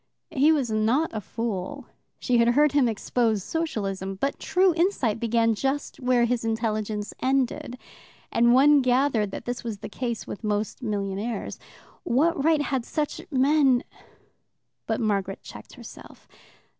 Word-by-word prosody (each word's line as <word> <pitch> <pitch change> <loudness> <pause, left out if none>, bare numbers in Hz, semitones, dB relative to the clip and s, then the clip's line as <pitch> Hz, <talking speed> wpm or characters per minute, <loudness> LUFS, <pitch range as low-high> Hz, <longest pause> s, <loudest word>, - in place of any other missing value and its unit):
He 300 0 +4
was 275 -7 +1
not 225 +9 +1
a 215 - -3
fool 205 -3 -4 0.3
she 245 -2 +1
had 235 - +4
heard 290 +5 +4
him 285 -4 +3
expose 220 -1 0
Socialism 195 - -3
but 275 +9 -2
true 370 0 +2
insight 325 - 0
began 230 0 +2
just 270 +6 -2
where 250 -2 +2
his 235 -1 -1
intelligence 215 -2 -2
ended, 260 -2 0 0.5
and 235 +1 +4
one 285 +2 +6
gathered 250 -4 +2
that 195 - -7
this 245 0 -4
was 225 -3 -4
the - - -8
case 235 0 -4
with 205 - -8
most 210 +3 -2
millionaires. 205 0 -3 0.4
What 305 0 +1
right 310 -1 +3
had 265 -4 -1
such 300 +4 -3
men 270 -2 +3 1.0
But 225 - -1
Margaret 200 -3 -1
checked - - -12
herself. - - -13
240 Hz, 145 wpm, -25 LUFS, 215-275 Hz, 1.0 s, one